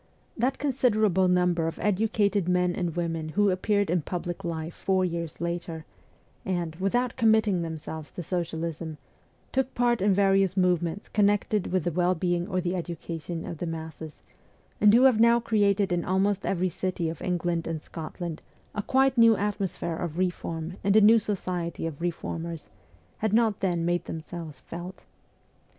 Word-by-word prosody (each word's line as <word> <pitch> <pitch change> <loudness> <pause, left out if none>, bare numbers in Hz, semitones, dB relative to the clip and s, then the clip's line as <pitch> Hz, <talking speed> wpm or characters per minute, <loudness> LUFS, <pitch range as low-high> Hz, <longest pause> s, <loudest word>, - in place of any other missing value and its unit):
That 255 +3 0
considerable 215 - +2
number 180 -2 +2
of 165 - -4
educated 205 -2 +1
men 180 0 +2
and 175 -4 -2
women 165 -2 -2
who 205 +4 +2
appeared 200 0 +1
in 175 -1 +2
public 175 +2 -5
life 165 -1 -4
four 190 -1 +1
years 170 -2 -4
later, 170 -1 -4 0.6
and, 175 -6 -2
without 235 +6 0
committing 220 -5 +3
themselves 160 -1 -6
to 175 - -5
socialism, 165 -2 -3 0.5
took 265 0 -1
part 240 -2 +2
in 200 +1 +3
various 195 -1 +3
movements 180 0 +1
connected 205 -1 +1
with 185 -3 +1
the 175 - 0
well 180 +2 +2
being 175 +1 0
or 185 -3 -1
the 180 0 -1
education 170 -1 -5
of 165 - -6
the 175 - -3
masses, 160 -1 -7 0.6
and 210 - +7
who 240 +4 +6
have 255 -5 +5
now 235 +1 +6
created 205 -4 +2
in 175 -1 +1
almost 195 +1 +1
every 185 -1 +1
city 180 -1 -2
of 160 -1 -5
England 175 -2 -1
and 160 -2 -4
Scotland 165 0 -6 0.3
a 210 - -2
quite 265 +3 +2
new 230 -2 +7
atmosphere 195 -5 -2
of 170 -2 -4
reform 175 -1 -2
and 200 +1 +3
a 215 - +7
new 225 +2 +7
society 180 -6 -3
of 160 -2 -5
reformers, 170 -1 -4 0.5
had 215 -1 0
not 220 -3 +3
then 175 -3 0
made 175 0 0
themselves 160 -3 -7
felt. 175 +2 -8
180 Hz, 160 wpm, -27 LUFS, 170-205 Hz, 0.6 s, and